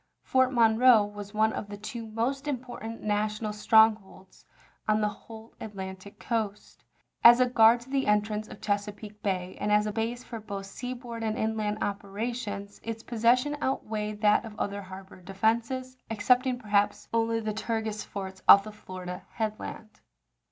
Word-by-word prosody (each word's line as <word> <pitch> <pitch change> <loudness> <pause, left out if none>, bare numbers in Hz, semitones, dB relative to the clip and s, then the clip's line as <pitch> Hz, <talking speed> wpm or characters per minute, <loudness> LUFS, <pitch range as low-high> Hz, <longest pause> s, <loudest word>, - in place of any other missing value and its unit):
Fort 260 0 +3
Monroe 230 -1 +5
was 205 0 -8
one 220 +1 +3
of 205 - -5
the 205 - -7
two 225 +2 -7
most 250 +6 -2
important 245 -4 -5
national 210 +1 -1
strongholds 215 -3 +2 0.4
on 215 0 +3
the 210 - +2
whole 220 +1 -10
At 215 -2 -7
lantic 190 +1 -8
coast. 215 -3 -4 0.4
As 240 +1 +9
a 255 - +5
guard 235 -1 +5
to 245 - -14
the 275 -1 0
entrance 210 +1 +1
of - - -12
Chesa 205 0 -1
peake 210 0 -12
Bay, 185 -2 -2
and 210 - 0
as 210 0 +4
a 210 - -1
base 230 +3 -3
for 230 - -7
both 200 -2 -6
seaboard 240 +2 -6
and 220 -1 -1
inland 215 -1 -1
operations, 205 0 -4
its 225 0 -5
possession 245 +5 +2
outweighed 215 -5 -2
that 210 +1 +4
of 220 -2 -10
other 200 0 -2
harbor 190 0 -11
defenses, 230 +7 -1
excepting, 245 +4 +2
perhaps, 205 -3 0
only 230 0 +1
the 215 -1 -3
Tortugas 220 0 -3
forts 190 -1 -7
off 200 - +10
the 215 - -8
Florida 185 -3 -8
headland. 215 0 -5
215 Hz, 160 wpm, -28 LUFS, 205-230 Hz, 0.4 s, off